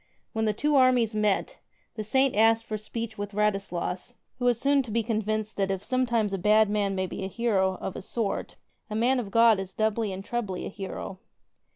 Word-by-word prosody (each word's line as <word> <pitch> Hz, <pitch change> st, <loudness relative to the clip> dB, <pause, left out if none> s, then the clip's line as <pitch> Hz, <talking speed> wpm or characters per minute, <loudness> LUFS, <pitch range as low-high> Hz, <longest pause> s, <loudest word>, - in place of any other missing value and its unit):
When 220 Hz, -1 st, 0 dB
the 215 Hz, -, +3 dB
two 295 Hz, +7 st, +1 dB
armies 250 Hz, -4 st, +4 dB
met, 210 Hz, -2 st, 0 dB, 0.3 s
the 215 Hz, -, -4 dB
Saint 265 Hz, +5 st, +2 dB
asked 225 Hz, +1 st, +4 dB
for 215 Hz, -, -4 dB
speech 220 Hz, +1 st, -5 dB
with 205 Hz, 0 st, -4 dB
Radislas 200 Hz, 0 st, -1 dB
— -, -, -50 dB
who 245 Hz, -, -1 dB
was 240 Hz, -2 st, +3 dB
soon 280 Hz, +1 st, +3 dB
to 250 Hz, -, -9 dB
be 230 Hz, +1 st, 0 dB
convinced 215 Hz, -1 st, -2 dB
that 195 Hz, -1 st, +1 dB
if 195 Hz, -1 st, -2 dB
sometimes 235 Hz, -5 st, 0 dB
a 195 Hz, -, -1 dB
bad 210 Hz, +2 st, +4 dB
man 200 Hz, -2 st, 0 dB
may 185 Hz, 0 st, 0 dB
be 185 Hz, -, -6 dB
a -, -, -2 dB
hero 195 Hz, -3 st, +1 dB
— -, -, -12 dB
of 190 Hz, -, -5 dB
a -, -, -5 dB
sort, 210 Hz, +1 st, -3 dB, 0.3 s
a 215 Hz, -, -4 dB
man 250 Hz, +4 st, +2 dB
of 220 Hz, -5 st, -4 dB
God 230 Hz, -1 st, +5 dB
is 190 Hz, -1 st, -6 dB
doubly 220 Hz, -1 st, 0 dB
and 190 Hz, +1 st, -6 dB
trebly 225 Hz, -7 st, -3 dB
a -, -, -4 dB
hero. 195 Hz, -1 st, -6 dB
215 Hz, 220 wpm, -27 LUFS, 195-235 Hz, 0.3 s, God